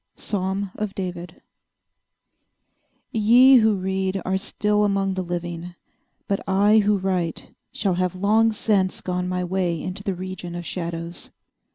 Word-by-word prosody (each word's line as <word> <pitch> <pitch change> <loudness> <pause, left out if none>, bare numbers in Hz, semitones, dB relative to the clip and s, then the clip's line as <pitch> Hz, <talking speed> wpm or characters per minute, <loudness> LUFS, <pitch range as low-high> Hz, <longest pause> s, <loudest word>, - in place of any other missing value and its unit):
_ - - -24
—Psalm 195 0 -2
of 210 -2 -4
David. 180 -2 -6 1.7
Ye 245 +5 +6
who 220 -2 +4
read 190 0 -1
are 190 - 0
still 210 +1 0
among 195 -1 +1
the 190 - -2
living; 175 0 -5 0.5
but 200 - 0
I 205 +3 +5
who 210 0 +3
write 185 -4 -2 0.2
shall 195 -3 0
have 180 0 -1
long 215 +4 +3
since 205 -3 0
gone 180 0 -2
my 180 0 -1
way 180 -2 -1
into 185 +3 -5
the 195 -1 -2
region 180 -1 -6
of 175 0 -6
shadows. 170 -1 -5
190 Hz, 145 wpm, -23 LUFS, 180-205 Hz, 1.7 s, Ye